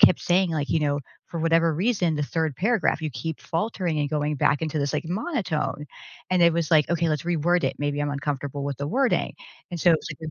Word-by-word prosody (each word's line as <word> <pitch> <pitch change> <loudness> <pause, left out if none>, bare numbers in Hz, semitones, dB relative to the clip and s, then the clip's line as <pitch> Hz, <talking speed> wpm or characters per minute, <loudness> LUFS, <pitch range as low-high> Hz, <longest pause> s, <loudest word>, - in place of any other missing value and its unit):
kept 180 - +6
saying 180 0 +2
like, 150 -3 -2
you 160 - +3
know, 145 -1 0 0.3
"For 165 - -5
whatever 165 -1 +3
reason, 180 -3 +1
the 150 - -1
3rd 160 -1 -1
paragraph, 210 - +1
you 155 - -2
keep 145 +6 -5
faltering 175 -2 -2
and 145 -1 0
going 150 0 0
back 140 +1 +2
into 155 -1 -1
this 140 -1 -1
like - - -1
monotone." 185 - -2 0.4
And 185 -1 +3
it 170 - +6
was 165 -1 -1
like, 155 -3 +5
"Okay, 170 -1 +1
let's 155 0 0
reword 175 0 +1
it." 135 - 0
Maybe 145 0 -1
I'm 145 0 0
uncomfortable 140 0 -3
with 140 -1 -3
the 140 - -4
wording. 260 - +1 0.4
And 170 - -4
so 175 - +5
it 160 - +3
like," 155 +1 -7
160 Hz, 225 wpm, -25 LUFS, 145-175 Hz, 0.4 s, kept